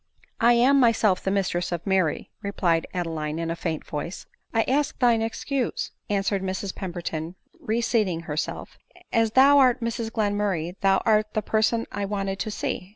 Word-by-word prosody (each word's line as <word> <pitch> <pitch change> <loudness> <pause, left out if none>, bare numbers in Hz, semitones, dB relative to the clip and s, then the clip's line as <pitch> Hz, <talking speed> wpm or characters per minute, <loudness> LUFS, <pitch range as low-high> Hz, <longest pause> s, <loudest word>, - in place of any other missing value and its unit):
"* - - -32
" - - -14
I - - +7
am 260 +4 +5
myself 225 -6 +3
the - - -1
mistress 185 -3 -1
of 170 -2 -3
IVfiiry," 190 -5 0
replied 175 -5 0
Adeline 160 -3 -3
in 165 0 -2
a - - -2
faint 165 -2 -4
voice. 160 +5 -5
" - - -47
I 225 - +2
ask 285 +2 0
thine 235 -3 +3
excuse," 245 +3 -2 0.2
answered 195 -1 0
Mrs 190 +1 -3
Pemberton, 175 -2 -5 0.2
re 225 +2 -1
seating 205 -8 +1
herself; 155 -2 -5 0.2
" - - -17
as 225 -1 +2
thou 280 +2 +7
art 255 -2 +4
Mrs 230 -1 -3
Glenmurray, 205 -6 -1
thou 195 -1 +3
art 215 -1 +2
the 215 - 0
person 225 +1 +1
I 205 0 -3
wanted 195 -1 -3
to - - -2
see." 190 -3 -4
200 Hz, 185 wpm, -25 LUFS, 175-225 Hz, 0.2 s, I